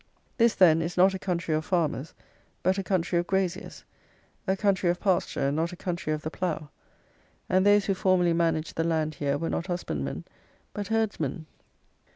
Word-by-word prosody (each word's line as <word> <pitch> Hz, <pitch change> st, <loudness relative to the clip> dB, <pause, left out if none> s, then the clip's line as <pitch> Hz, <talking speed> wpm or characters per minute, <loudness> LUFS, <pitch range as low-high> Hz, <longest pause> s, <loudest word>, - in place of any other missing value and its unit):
This, 230 Hz, -1 st, +4 dB
then, 165 Hz, -3 st, +5 dB
is 170 Hz, +2 st, -4 dB
not 190 Hz, +2 st, +5 dB
a 190 Hz, -, -4 dB
country 170 Hz, -4 st, -2 dB
of 155 Hz, 0 st, 0 dB
farmers, 160 Hz, -5 st, -1 dB, 0.5 s
but 185 Hz, +2 st, +2 dB
a -, -, -2 dB
country 175 Hz, -2 st, 0 dB
of 175 Hz, -, -3 dB
graziers; 190 Hz, -1 st, -2 dB, 0.6 s
a 190 Hz, +1 st, +1 dB
country 190 Hz, -3 st, +2 dB
of 175 Hz, -, 0 dB
pasture, 180 Hz, -7 st, +1 dB
and 140 Hz, -, -2 dB
not 165 Hz, +3 st, 0 dB
a -, -, -7 dB
country 175 Hz, -3 st, -3 dB
of 155 Hz, 0 st, -2 dB
the 155 Hz, -, -4 dB
plough; 160 Hz, -5 st, -3 dB, 0.8 s
and 185 Hz, +1 st, +3 dB
those 205 Hz, 0 st, +5 dB
who 195 Hz, -, +1 dB
formerly 185 Hz, -2 st, +2 dB
managed 165 Hz, -1 st, 0 dB
the 165 Hz, -, +2 dB
land 160 Hz, -2 st, 0 dB
here 140 Hz, -1 st, -1 dB
were 165 Hz, -, -3 dB
not 170 Hz, -, -2 dB
husbandmen, 75 Hz, -, -3 dB, 0.5 s
but 205 Hz, -1 st, -4 dB
herdsmen. 200 Hz, -9 st, -1 dB
175 Hz, 185 wpm, -27 LUFS, 160-190 Hz, 0.8 s, then